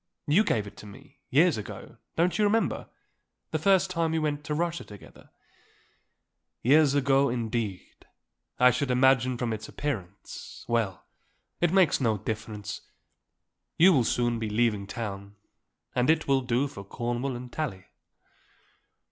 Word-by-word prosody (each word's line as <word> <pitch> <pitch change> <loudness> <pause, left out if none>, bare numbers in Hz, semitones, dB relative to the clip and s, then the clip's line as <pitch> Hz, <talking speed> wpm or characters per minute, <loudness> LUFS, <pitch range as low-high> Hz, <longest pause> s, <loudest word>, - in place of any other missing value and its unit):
You 165 +9 +4
gave 110 - 0
it 100 - -11
to 105 - -11
me 135 +8 -15
years 155 +3 +4
ago 105 - -9 0.2
don't 175 +5 +1
you - - +4
remember; 220 +2 +1 0.6
the - - 0
first 190 -1 +3
time 165 -2 0
that 160 - -1
we - - +2
went 150 -1 -2
to 150 - -2
Russia 170 +1 -1
together." 105 -2 -14 1.3
"Years 145 +2 +5
ago, 140 -1 +3
indeed, 115 -5 -4 0.5
I 125 0 +7
should 130 +2 -2
imagine 130 -1 +3
from 120 -2 -1
its 110 0 -6
appearance. 100 -11 -6
Well; 115 -6 -1 0.5
it 175 -1 +2
makes 185 -7 +4
no 110 -4 +2
difference; 110 0 -5 1.0
you 180 +3 +7
will 130 -6 +4
soon 120 0 0
be 110 -1 -3
leaving 105 -2 +1
town 100 -2 -6 0.6
and 125 +2 +1
it 160 0 +2
will 135 -1 +3
do 125 +2 0
for 130 -8 -9
Cornwall 120 +5 -3
and 125 0 -9
Tallie." 100 -13 -4
125 Hz, 150 wpm, -27 LUFS, 110-150 Hz, 1.3 s, I